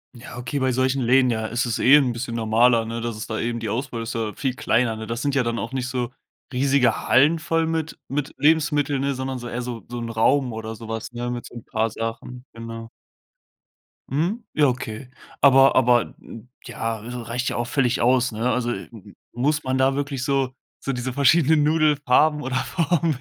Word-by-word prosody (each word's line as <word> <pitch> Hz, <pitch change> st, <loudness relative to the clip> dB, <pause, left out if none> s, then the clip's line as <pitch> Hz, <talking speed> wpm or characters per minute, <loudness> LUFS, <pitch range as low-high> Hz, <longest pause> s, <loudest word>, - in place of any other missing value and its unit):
Ja, 120 Hz, 0 st, -10 dB
okay, 125 Hz, +3 st, -3 dB
bei 130 Hz, -1 st, +1 dB
solchen 130 Hz, +1 st, +1 dB
Läden, 125 Hz, +1 st, +4 dB
ja, 110 Hz, -1 st, -2 dB
ist 120 Hz, +3 st, -1 dB
es 115 Hz, -, -2 dB
eh 135 Hz, +4 st, +7 dB
'n 135 Hz, -4 st, +4 dB
bisschen 115 Hz, 0 st, -4 dB
normaler, 115 Hz, +1 st, +3 dB
ne, 115 Hz, +1 st, -4 dB
dass 115 Hz, -1 st, -3 dB
es 110 Hz, 0 st, -6 dB
da 110 Hz, -, -3 dB
eben 115 Hz, 0 st, -2 dB
die 110 Hz, -, -3 dB
Auswahl 120 Hz, -1 st, -3 dB
ist 115 Hz, -, -5 dB
ja 110 Hz, -2 st, -2 dB
viel 130 Hz, -3 st, -2 dB
kleiner, 115 Hz, -2 st, +1 dB
ne? 110 Hz, -1 st, -7 dB
Das 115 Hz, +1 st, -3 dB
sind 140 Hz, -1 st, -1 dB
ja 130 Hz, -, +3 dB
dann 115 Hz, 0 st, -2 dB
auch 115 Hz, -, -4 dB
nicht 130 Hz, -1 st, -2 dB
so 125 Hz, -1 st, -3 dB, 0.4 s
riesige 130 Hz, -2 st, +2 dB
Hallen 150 Hz, +6 st, +4 dB
voll 165 Hz, 0 st, 0 dB
mit 160 Hz, -1 st, -3 dB
mit 145 Hz, +1 st, -3 dB
Lebensmitteln, 150 Hz, -2 st, +2 dB
ne, 140 Hz, 0 st, -1 dB
sondern 130 Hz, 0 st, -4 dB
so 120 Hz, -, -7 dB
eher 120 Hz, +1 st, -4 dB
so 120 Hz, -4 st, -6 dB
so 120 Hz, 0 st, -6 dB
'n 115 Hz, -, -4 dB
Raum 125 Hz, +3 st, +2 dB
oder 110 Hz, 0 st, -6 dB
so 115 Hz, 0 st, -10 dB
was, 115 Hz, +1 st, -5 dB
ne, 120 Hz, 0 st, -3 dB
mit 120 Hz, -1 st, -5 dB
so -, -, -12 dB
'n 115 Hz, -, -8 dB
paar 110 Hz, +1 st, -1 dB
Sachen, 115 Hz, +3 st, -6 dB
genau. 115 Hz, 0 st, -8 dB, 1.2 s
Mhm. 175 Hz, -, -1 dB
Ja, 150 Hz, -2 st, +4 dB
okay. 125 Hz, -1 st, -4 dB, 0.3 s
Aber 135 Hz, -1 st, +6 dB
aber 125 Hz, -2 st, +3 dB, 0.5 s
ja, 115 Hz, -3 st, -4 dB
r 120 Hz, 0 st, -7 dB
reicht 125 Hz, +2 st, -1 dB
ja -, -, -4 dB
auch 120 Hz, 0 st, -2 dB
völlig 125 Hz, -2 st, +1 dB
aus, 125 Hz, 0 st, +3 dB
ne? 115 Hz, +3 st, -1 dB
Also, 120 Hz, -1 st, 0 dB, 0.6 s
muss 145 Hz, +5 st, 0 dB
man 130 Hz, 0 st, -1 dB
da 135 Hz, +1 st, +2 dB
wirklich 140 Hz, -2 st, -3 dB
so 135 Hz, -2 st, 0 dB, 0.3 s
so 135 Hz, -, -1 dB
diese 125 Hz, 0 st, -3 dB
verschiedenen 150 Hz, +2 st, +4 dB
Nudelfarben 150 Hz, -1 st, +3 dB
oder 130 Hz, -2 st, -3 dB
Formen 165 Hz, 0 st, 0 dB
125 Hz, 205 wpm, -23 LUFS, 115-140 Hz, 1.2 s, eh